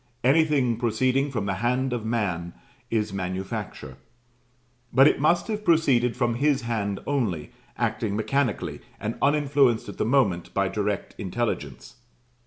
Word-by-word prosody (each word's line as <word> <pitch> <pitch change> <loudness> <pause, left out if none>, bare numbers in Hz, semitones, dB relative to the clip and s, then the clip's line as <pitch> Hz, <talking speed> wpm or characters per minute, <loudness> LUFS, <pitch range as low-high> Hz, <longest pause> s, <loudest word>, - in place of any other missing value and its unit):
Anything 135 -4 +3
proceeding 130 +4 +1
from 115 -7 -3
the 100 - 0
hand 125 +2 +1
of 120 -3 -3
man 100 -7 -2 0.4
is 105 -3 -1
manufacture; 95 +3 -5 0.9
but 135 +3 +7
it - - +2
must 170 +4 +2
have 215 -1 -3
proceeded 135 - +3
from 120 -2 +1
his 140 +1 +1
hand 105 -4 -2
only, 110 - -1 0.3
acting 105 -3 -1
mechanically, 125 +2 -1 0.2
and 110 +2 -3
uninfluenced 140 -4 +3
at - - -9
the - - +2
moment 105 -9 +1
by 100 -1 +2
direct 100 0 -2
intelligence. 100 - -4
120 Hz, 135 wpm, -25 LUFS, 100-135 Hz, 0.9 s, but